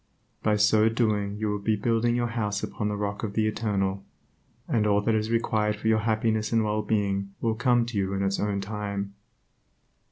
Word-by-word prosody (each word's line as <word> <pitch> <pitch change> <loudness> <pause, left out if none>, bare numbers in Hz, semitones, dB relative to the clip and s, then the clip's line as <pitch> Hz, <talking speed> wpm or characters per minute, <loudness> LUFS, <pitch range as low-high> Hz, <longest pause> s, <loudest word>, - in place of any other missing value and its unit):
By 105 -1 +2
so 105 +1 +4
doing 105 -3 0
you 110 0 -1
will 105 - -2
be 110 +2 +1
building 115 +2 +1
your 120 -1 0
house 105 -3 -2
upon 105 - -3
the 105 - -1
rock 100 0 -3
of 105 -3 -3
the 110 0 +1
Eternal, 100 -3 -1 0.6
and 110 -2 +1
all 100 -1 +4
that 110 +2 +1
is 110 0 0
required 110 -2 +1
for 105 +1 -4
your 110 -1 +4
happiness 110 0 0
and 115 -1 +3
well 105 0 0
being 100 -2 -1
will 115 -1 0
come 120 0 +2
to 115 -2 -5
you 95 0 -1
in 100 - -1
its 95 0 0
own 100 -1 -1
time. 100 -1 -4
105 Hz, 200 wpm, -26 LUFS, 100-110 Hz, 0.6 s, so